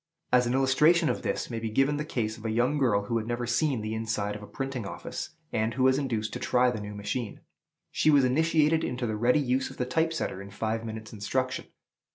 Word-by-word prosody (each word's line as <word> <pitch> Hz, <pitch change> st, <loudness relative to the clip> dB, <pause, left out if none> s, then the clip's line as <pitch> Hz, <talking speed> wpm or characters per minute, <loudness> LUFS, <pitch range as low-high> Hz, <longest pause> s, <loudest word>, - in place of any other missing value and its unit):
As 125 Hz, -1 st, +5 dB
an 120 Hz, -, 0 dB
illustration 150 Hz, +6 st, +4 dB
of -, -, -1 dB
this, -, -, -2 dB
may 115 Hz, -, -2 dB
be 115 Hz, 0 st, -3 dB
given 135 Hz, +6 st, +2 dB
the 150 Hz, -, -2 dB
case 110 Hz, -7 st, -2 dB
of 110 Hz, -, -13 dB
a 115 Hz, -, -2 dB
young 120 Hz, +6 st, +1 dB
girl 110 Hz, -7 st, +2 dB
who 115 Hz, +3 st, -1 dB
had 110 Hz, -, -6 dB
never 120 Hz, 0 st, -2 dB
seen 135 Hz, -1 st, +1 dB
the 110 Hz, +1 st, -3 dB
inside 110 Hz, -2 st, -2 dB
of 105 Hz, -, -8 dB
a 105 Hz, -, -9 dB
printing 135 Hz, -3 st, -4 dB
office, -, -, -6 dB, 0.2 s
and 110 Hz, +1 st, 0 dB
who 130 Hz, -, +1 dB
was 130 Hz, +1 st, +4 dB
induced 115 Hz, -6 st, -2 dB
to -, -, -4 dB
try 125 Hz, 0 st, +3 dB
the 110 Hz, -, -4 dB
new 105 Hz, 0 st, -7 dB
machine. 105 Hz, +2 st, -4 dB, 0.5 s
She -, -, +2 dB
was 140 Hz, -3 st, +6 dB
initiated 160 Hz, +3 st, +3 dB
into 125 Hz, 0 st, -2 dB
the 110 Hz, -2 st, -1 dB
ready 120 Hz, +6 st, +3 dB
use 130 Hz, -2 st, 0 dB
of -, -, -12 dB
the 125 Hz, -, -1 dB
type 160 Hz, +6 st, +1 dB
setter 125 Hz, -11 st, -3 dB
in 100 Hz, -, -9 dB
five 110 Hz, +3 st, -2 dB
minutes' 110 Hz, -1 st, -7 dB
instruction. 130 Hz, +5 st, -2 dB
125 Hz, 235 wpm, -28 LUFS, 110-135 Hz, 0.5 s, was